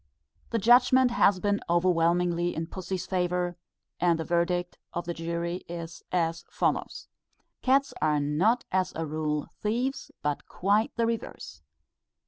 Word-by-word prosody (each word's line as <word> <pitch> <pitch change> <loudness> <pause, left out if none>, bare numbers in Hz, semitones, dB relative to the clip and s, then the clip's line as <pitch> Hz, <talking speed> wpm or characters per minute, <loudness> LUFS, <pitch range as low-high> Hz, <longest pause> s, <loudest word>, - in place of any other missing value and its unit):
The 230 - 0
judgment 245 +3 +5
has 200 -5 +4
been 205 +1 +1
overwhelmingly 175 0 +2
in 160 - -2
pussy's 185 +1 -5
favour, 180 -1 -1 0.4
and 170 -1 +3
the 160 - -2
verdict 175 +1 0 0.2
of 175 0 -2
the 170 - -3
jury 170 +2 -3
as 170 -1 -7 0.5
follows: - - -1 0.5
"_Cats 270 +2 +3
are 150 -1 +3
not 170 +12 +2
as 185 -1 +1
a 165 - -2
rule 150 -1 -2
thieves, 245 +6 -1
but 145 -1 -2
quite 205 +4 +1
the 230 - +1
reverse. 230 0 -4
175 Hz, 130 wpm, -28 LUFS, 170-210 Hz, 0.5 s, judgment